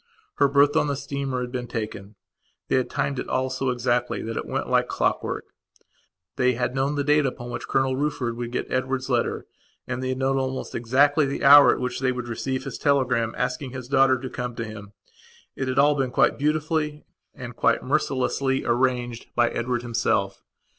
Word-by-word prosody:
Her - - +5
berth 140 +1 +4
on - - +3
the 140 - -1
steamer 140 -1 -3
had 125 0 -5
been 125 -1 -4
taken. 110 -3 -6 0.5
They - - +3
had 130 - 0
timed 140 -2 -2
it - - -5
all 130 0 0
so 130 0 -1
exactly 125 0 0
that 115 0 -4
it - - -4
went - - -2
like - - +2
clockwork. - - -1 0.9
They 125 0 +3
had 125 +1 -2
known 135 +2 0
the 145 - 0
date 150 0 +3
upon 120 -1 -6
which 120 0 -6
Colonel 135 -1 +1
Rufford 130 -4 -2
would 120 0 -5
get - - -3
Edward's 130 0 -1
letter 120 -1 0 0.4
and 130 0 -4
they 130 - -2
had 130 - -2
known 135 +1 +1
almost 130 0 -3
exactly 140 +5 +3
the 140 - -4
hour 145 +1 +9
at - - -1
which 125 0 -3
they 130 -1 +1
would 125 -1 -5
receive 130 +3 -3
his - - -6
telegram 130 -5 +1
asking 125 +1 -2
his 130 -2 -7
daughter 135 -1 +4
to 130 - -5
come 125 -1 -5
to 115 - -4
him. 105 -2 -10 0.6
It 130 - -3
had 130 0 -2
all 145 +2 +5
been 135 -3 -1
quite 125 - +2
beautifully 150 0 -1 0.3
and - - -8
quite - - +2
mercilessly 135 0 0
arranged, 120 -1 0
by 120 0 +3
Edward 120 0 -2
himself. 110 -4 -1
130 Hz, 195 wpm, -24 LUFS, 120-135 Hz, 0.9 s, hour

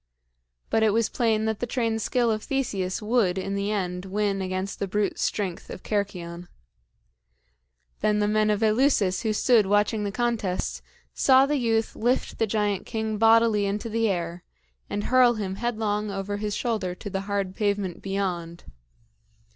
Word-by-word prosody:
But 225 - +3
it 220 -2 +3
was 230 0 +2
plain 220 -2 +1
that 220 -1 -1
the 245 - -2
trained 230 -2 -1
skill 240 +1 +1
of 215 0 -1
Theseus 210 -9 -2
would, 210 -5 +2
in 195 +1 -3
the 200 +1 -1
end, 180 -3 -2
win 200 0 -1
against 185 +1 -3
the 200 - -1
brute 205 +1 -1
strength 190 -5 -2
of - - -8
Cercyon. 180 -4 -3 1.5
Then 210 0 +2
the 210 0 +2
men 215 0 +2
of 210 +1 +1
Eleusis 215 -4 +2
who 220 - 0
stood 215 -1 +3
watching 205 +2 +2
the 200 - -2
contest, 220 -5 -1 0.3
saw 265 0 +5
the 295 +1 0
youth 225 -3 0
lift 245 +3 -1
the 225 - +2
giant 205 -2 -1
king 220 -2 -2
bodily 225 -2 +4
into 210 +3 -3
the 225 0 +1
air 175 -2 -3 0.5
and 205 - -2
hurl 250 -2 +4
him 195 -3 -4
headlong 215 -2 -1
over 200 +1 -3
his 210 0 -3
shoulder 210 -7 -2
to 205 - -7
the 195 - -2
hard 200 -2 -1
pavement 200 -4 -1
beyond. 180 -4 -3
210 Hz, 165 wpm, -25 LUFS, 195-225 Hz, 1.5 s, saw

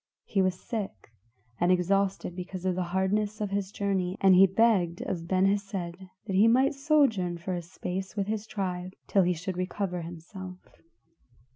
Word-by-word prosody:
He 195 - +1
was 185 -1 +1
sick 195 - -5 0.5
and 175 +1 +3
exhausted 190 0 +1
because 185 0 -6
of 185 - +2
the 185 - -2
hardness 205 +3 0
of 205 -2 -2
his 200 -1 -2
journey, 190 -3 -1
and 190 -1 +6
he 190 +2 +8
begged 190 -4 +2
of 170 -2 -4
Ben 185 +1 +3
Hesed 200 0 0
that 185 0 -5 0.3
he 205 +4 +6
might 260 +5 +4
sojourn 275 - +2
for 175 +2 -4
a 175 - -2
space 185 +3 -5
with 200 -2 0
his 215 +1 -3
tribe 185 -2 -3
till 195 - +3
he 180 0 +2
should 180 +2 -5
recover 185 -1 -2
himself. 180 +3 -8
190 Hz, 170 wpm, -28 LUFS, 180-200 Hz, 0.5 s, he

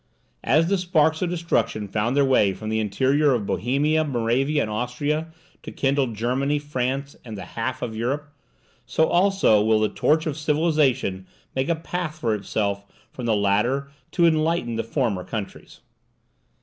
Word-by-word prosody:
As 155 +7 +3
the 195 +1 +1
sparks 160 -3 +2
of 180 - 0
destruction 120 -11 -1
found 110 +5 -1
their 140 - +5
way 105 -7 +3
from 110 +2 -6
the 110 0 0
interior 135 +7 +2
of 110 -4 -2
Bohemia, 145 +9 +1
Moravia, 135 +2 0
and 110 - -4
Austria, 145 +8 -2 0.3
to - - -8
kindle 135 -1 +1
Germany, 125 +6 -1
France, 140 -1 -3
and 110 -4 -8
the 95 - -7
half 125 +3 -3
of 115 -2 -4
Europe, 140 +6 -3 0.5
so 160 - +2
also 185 - +3
will 110 0 +3
the 110 - +2
torch 155 +1 +1
of 155 -2 -3
civilization 150 - +1 0.3
make 130 +3 -1
a 170 - +3
path 165 -1 -4
for 115 -7 0
itself 100 -1 -2 0.3
from 125 -2 -6
the 110 - +3
latter 105 +8 +1 0.2
to 170 - +3
enlighten 160 -6 +1
the 115 - -1
former 115 -6 -1
countries. 105 -1 -7
135 Hz, 160 wpm, -24 LUFS, 110-155 Hz, 0.5 s, their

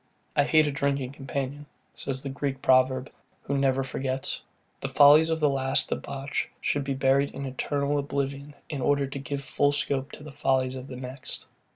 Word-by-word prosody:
I 145 - +4
hate 155 +1 +5
a 145 - 0
drinking 140 -2 -1
companion, 140 +1 -4 0.3
says 135 -1 -3
the 140 - -3
Greek 135 0 -3
proverb, 130 +1 +3 0.3
who 140 - -2
never 135 -1 +2
forgets. 130 0 -2 0.4
The - - -3
follies 145 +3 +7
of 160 0 0
the 150 - +4
last 135 -1 +1
debauch 140 0 -3
should 145 - 0
be 135 0 -2
buried 135 +1 +3
in 140 - -4
eternal 140 +2 -1
oblivion, 140 0 -3
in 145 -3 -4
order 140 +1 +2
to 135 +1 -6
give 140 +1 -4
full 145 +1 +2
scope 140 -1 -1
to - - -9
the 150 - -9
follies 130 -2 +1
of 130 0 -7
the 130 - -7
next. 130 +1 -6
140 Hz, 185 wpm, -27 LUFS, 135-145 Hz, 0.4 s, follies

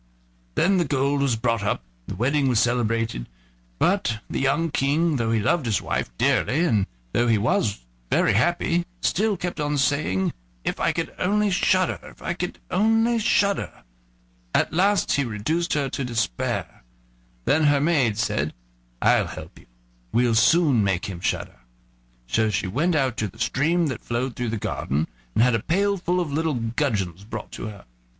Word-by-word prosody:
Then 190 +1 +3
the 175 - +2
gold 140 0 +1
was 135 -4 +2
brought 115 -1 0
up, 100 - -1 0.2
and - - -5
the - - -11
wedding 135 +4 +2
was 120 -4 +3
celebrated, 115 - 0 0.5
but 120 - +1
the - - -3
young 150 +4 +1
King, 150 +3 +1
though 115 -2 0
he 115 - +2
loved 135 +5 +1
his 110 - +2
wife - - -2
dearly, 155 +7 +2
and 105 - +2 0.3
though 120 - +2
he 115 -2 +4
was 105 - 0 0.2
very - - +3
happy, 170 - +1
still 210 +1 +1
kept 175 -2 -4
on 145 0 0
saying: 125 -9 +1 0.3
"If - - -2
I - - +2
could - - -3
only 205 +2 +2
shudder! 185 0 +2
if - - -14
I 170 - -2
could 180 0 -4
only 225 +4 +3
shudder!" 200 - +1 0.7
At - - +2
last 195 +2 +2
he 140 - +2
reduced 135 +10 -1
her 145 -2 0
to 135 - -3
despair. 115 - -2 0.6
Then 155 +1 +3
her 145 -1 +4
maid 140 -8 +2
said: 75 - -1 0.5
"I'll - - +4
help - - -9
you; - - -20 0.4
we'll 120 -1 +2
soon 135 0 +4
make 95 -3 0
him 95 -3 -6
shudder." 85 - -3 0.7
So 110 - +1
she 105 - -1
went 150 - 0
out 130 -5 +1
to 110 - -1
the 105 - -14
stream 160 +8 +1
that 130 -6 -3
flowed 120 +1 -2
through 120 -1 -2
the 110 - -2
garden, 75 -6 -2 0.3
and 115 - +5
had 125 -1 +3
a 115 - +2
pail 200 - +1
full 180 -1 -1
of 160 -5 -2
little 160 -1 0
gudgeons 110 - -2
brought 110 0 -7
to - - -6
her. 105 -2 -10
135 Hz, 175 wpm, -24 LUFS, 110-170 Hz, 0.7 s, and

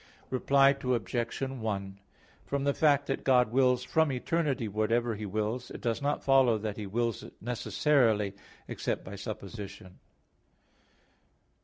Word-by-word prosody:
Reply 135 +1 +4
Obj. 120 -4 -1
1: 105 -7 -4 0.5
From 140 0 -1
the 140 0 +2
fact 145 -2 +3
that 135 - -3
God 125 -4 +4
wills 125 0 +3
from 160 -2 +2
eternity 135 -2 -1
whatever 115 +3 0
He 105 0 -5
wills, 110 +5 -2
it - - -8
does 115 +1 -1
not 145 +1 -1
follow 135 -4 +4
that 105 -1 -4
He 105 -2 -5
wills 115 +2 -1
it - - -11
necessarily; 115 -3 +1 0.3
except - - -3
by 100 - -8
supposition. 100 -1 -8
120 Hz, 135 wpm, -30 LUFS, 105-135 Hz, 0.5 s, Reply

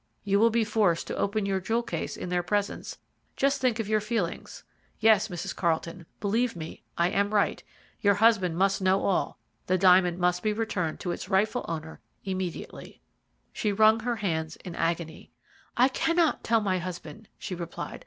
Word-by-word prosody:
You 200 0 +2
will 230 +2 +5
be 230 0 +2
forced 210 -6 +1
to - - -4
open 205 +1 0
your 195 -1 0
jewel 230 +5 -1
case 170 -7 -4
in - - -5
their 180 0 +1
presence 205 +3 -2 0.4
just 275 +1 +1
think 250 -3 +2
of 225 -3 -3
your 215 0 +2
feelings. 210 -5 -3 0.4
Yes, 220 -2 +5
Mrs. 185 0 -5
Carlton, 170 0 -2
believe 225 +3 0
me 160 -1 -8 0.2
I 170 +1 +3
am 200 +2 0
right: 205 - +2 0.4
your 200 -1 +3
husband 200 -6 +3
must 195 +1 +2
know 190 +1 +2
all, 195 - 0 0.3
the 185 - +2
diamond 180 -1 +5
must 180 0 +1
be 215 -1 0
returned 205 -7 -2
to 175 - -2
its - - -6
rightful 210 +5 +1
owner 160 -1 -5 0.3
immediately." 185 -3 -5 0.5
She 210 - -1
wrung 215 +2 +5
her 240 +1 -1
hands 165 -6 -2
in 180 - -6
agony. 170 -1 -3 0.5
"I 250 +2 +6
cannot 330 +4 +1
tell 230 -1 +2
my 190 -3 0
husband," 185 +4 -8
she - - -6
replied. 170 -1 -6
195 Hz, 175 wpm, -27 LUFS, 175-220 Hz, 0.5 s, I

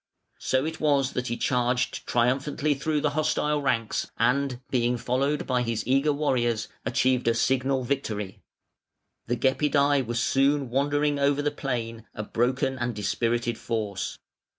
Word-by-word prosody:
So 130 +2 +1
it 160 0 -4
was 140 -3 +2
that 125 0 -2
he 120 - -2
charged 125 -1 0
triumphantly 135 +5 +1
through 150 +2 -1
the 150 - +1
hostile 150 0 0
ranks, 115 -5 -1
and, 125 +2 +1
being 125 -1 +1
followed 135 +5 0
by 125 -1 +1
his 115 -2 -2
eager 135 +4 +3
warriors, 120 -6 0 0.2
achieved 130 -1 +1
a 115 - +3
signal 130 +2 +1
victory. 110 -7 -3 0.9
The 120 - 0
Gepidæ 140 +1 +2
were 120 - -3
soon 135 +2 +2
wandering 145 +2 +1
over 140 +1 +2
the 150 - +1
plain, 115 -4 -4
a 105 - -4
broken 125 +4 0
and 120 -2 -2
dispirited 115 +3 -1
force. 105 -4 -3
130 Hz, 145 wpm, -26 LUFS, 120-140 Hz, 0.9 s, eager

